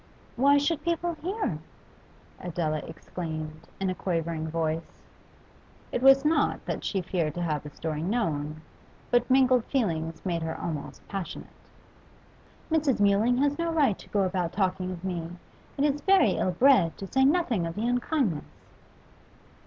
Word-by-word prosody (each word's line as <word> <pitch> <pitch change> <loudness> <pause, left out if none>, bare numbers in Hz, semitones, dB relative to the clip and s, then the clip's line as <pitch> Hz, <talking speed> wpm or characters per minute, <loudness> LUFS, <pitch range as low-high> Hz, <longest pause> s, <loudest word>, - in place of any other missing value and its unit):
'Why 280 +3 +5
should 295 +1 0
people 340 +1 0
hear?' 375 +7 -3 0.8
Adela 160 -3 -2
exclaimed, 155 -1 -6
in 190 -1 0
a - - -1
quivering 165 -3 -2
voice. 160 0 -3 0.9
It 245 - -1
was 270 +1 +7
not 315 +2 +1
that - - -3
she 195 -3 -1
feared 165 -4 -1
to 175 - -3
have 155 -3 -1
the 150 - -9
story 155 +1 -4
known, 155 -7 -1 0.5
but 245 +1 +3
mingled 255 -2 +5
feelings 165 - -2
made 170 -3 -1
her 160 0 -4
almost 155 -4 -6
passionate. 195 -3 -6 1.2
'Mrs. 300 -7 +2
Mewling 205 +4 +3
has 290 +2 +1
no 335 0 0
right 285 - +2
to - - -14
go 200 -1 +1
about 180 -2 -1
talking 185 -1 0
of 180 -1 -7
me. 175 -2 -4 0.4
It 280 - +1
is 290 0 +1
very 385 -4 +5
ill - - 0
bred, 185 - +4
to 195 - -6
say 265 +7 +2
nothing 265 - +2
of 165 - -6
the 215 +3 -2
unkindness. 245 - -1
190 Hz, 155 wpm, -27 LUFS, 165-270 Hz, 1.2 s, was